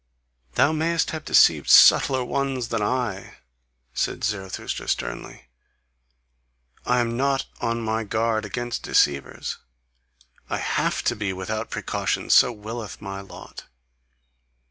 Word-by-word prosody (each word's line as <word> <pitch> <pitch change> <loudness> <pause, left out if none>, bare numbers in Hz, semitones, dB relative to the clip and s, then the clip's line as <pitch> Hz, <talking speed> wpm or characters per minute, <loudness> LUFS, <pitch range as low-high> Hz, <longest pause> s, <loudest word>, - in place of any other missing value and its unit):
"Thou 140 - +4
mayest 160 +1 0
have 160 -1 -6
deceived - - +4
subtler 130 -2 +6
ones 135 -3 -2
than 115 -2 -1
I," 115 -3 -2 0.6
said - - -2
Zarathustra 95 -3 -4
sternly. - - -4 1.4
"I 125 0 +3
am 115 -1 -2
not 135 +1 0 0.2
on 115 0 -1
my 110 0 -1
guard 110 +1 -1
against 120 -1 -4
deceivers; 70 -1 0 0.9
I - - -1
HAVE - - -1
TO - - +1
BE 100 -3 -3
without 110 +4 -4
precaution: - - -2
so 125 - +6
willeth 110 0 -7
my 100 -1 -6
lot. 100 - -12
115 Hz, 120 wpm, -24 LUFS, 105-130 Hz, 1.4 s, subtler